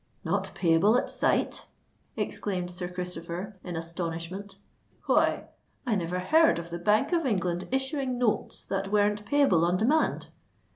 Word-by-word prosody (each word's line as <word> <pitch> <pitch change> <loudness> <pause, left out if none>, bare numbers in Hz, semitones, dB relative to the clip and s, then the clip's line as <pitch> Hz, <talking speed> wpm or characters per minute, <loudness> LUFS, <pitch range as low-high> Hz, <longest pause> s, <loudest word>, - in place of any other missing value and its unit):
"Not 195 +3 -2
payable 180 +6 +4
at - - -1
sight!" - - +1 0.5
exclaimed 180 -3 -2
Sir 180 0 -4
Christopher, 180 +2 -5
in 175 -2 -5
astonishment. 170 +4 -5 0.5
"Why—I 245 - -1
never 180 -2 -1
heard 320 - +4
of 170 0 -7
the 170 - -4
Bank 210 - +2
of 335 -1 +2
England 180 - -1
issuing 265 -1 -1
notes 240 -3 0
that 195 0 -3
weren't 210 0 +1
payable 275 - +4
on 175 +2 +2
demand." 275 +10 +1
190 Hz, 135 wpm, -28 LUFS, 175-220 Hz, 0.5 s, payable